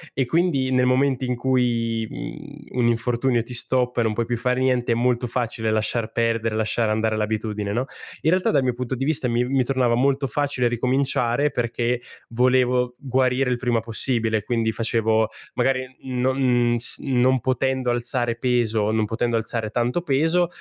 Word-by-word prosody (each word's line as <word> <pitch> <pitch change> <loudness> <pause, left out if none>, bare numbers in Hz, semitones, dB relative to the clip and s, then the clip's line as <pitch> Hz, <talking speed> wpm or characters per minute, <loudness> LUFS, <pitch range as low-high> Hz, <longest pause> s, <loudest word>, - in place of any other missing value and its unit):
e 135 - +1
quindi 145 -3 +1
nel 125 -1 +3
momento 130 0 +2
in 125 -1 -1
cui, 120 -3 0
mhmm, 150 -4 -8
un 120 - +3
infortunio 120 +1 +1
ti 125 - -9
stoppa 125 0 0
e - - +3
non 110 -1 0
puoi 115 +2 -1
più 120 0 -2
fare 125 +1 0
niente 125 -2 +1
è - - 0
molto 125 +1 +1
facile 115 -2 -2
lasciar 110 +1 -1
perdere, 115 -1 0
lasciare 110 +1 0
andare 110 0 0
l'abitudine, 105 -1 -2
no? 120 +5 -1 0.4
In 160 - +2
realtà 185 0 +2
dal 135 - +2
mio 125 -1 +1
punto 125 +1 -4
di 135 +2 -2
vista 150 -4 0
mi 120 +1 +1
mi 130 +1 +1
tornava 125 -2 +1
molto 135 +3 +1
facile 135 -1 0
ricominciare 125 +2 +1
perché 120 0 -1 0.3
volevo 125 +1 +2
g - - -19 0.2
guarire 130 0 +1
il 125 - +1
prima 120 -2 0
possibile 115 -1 -1
quindi 115 +1 0
facevo 110 0 +1 0.3
magari 130 +1 +1 0.2
n 130 -1 -3
non 125 -2 +2
s 120 - -1
non 130 -1 +2
potendo 130 +1 0
alzare 120 0 -1
peso, 115 -3 +1
non 110 0 +1
potendo 115 +2 -1
alzare 115 -1 -2
tanto 120 +8 0
peso, 165 +3 +2
125 Hz, 180 wpm, -23 LUFS, 115-130 Hz, 0.4 s, nel